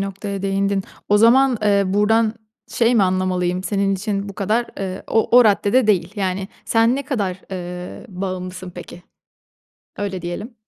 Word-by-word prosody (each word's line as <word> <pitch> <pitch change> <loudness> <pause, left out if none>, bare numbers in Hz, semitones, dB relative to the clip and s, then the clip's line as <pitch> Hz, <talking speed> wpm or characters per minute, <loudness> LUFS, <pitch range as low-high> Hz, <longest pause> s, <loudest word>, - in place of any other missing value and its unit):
noktaya 195 0 -4
değindin. 195 0 0 0.3
O 205 0 +4
zaman, 250 +2 +5
eee, 200 -1 +3
buradan 215 +3 +2 0.3
şey 235 +1 +2
mi 220 - +4
anlamalıyım? 185 -1 0
Senin 195 -1 0
için 200 +1 -3
bu 200 - -8
kadar, 215 +5 0
eee, 190 -1 -4
o 225 +2 +3
o 250 - +7
raddede 215 +3 +3
değil. 190 -3 +2
Yani, 190 -1 -2 0.2
sen 230 +2 +3
ne 280 - -4
kadar, 200 -10 -2
eee, 180 -1 -7
bağımlısın 185 -1 -5
peki? 175 0 -11 1.0
Öyle 195 -3 -3
diyelim. 200 +8 -6
195 Hz, 150 wpm, -20 LUFS, 185-215 Hz, 1.0 s, o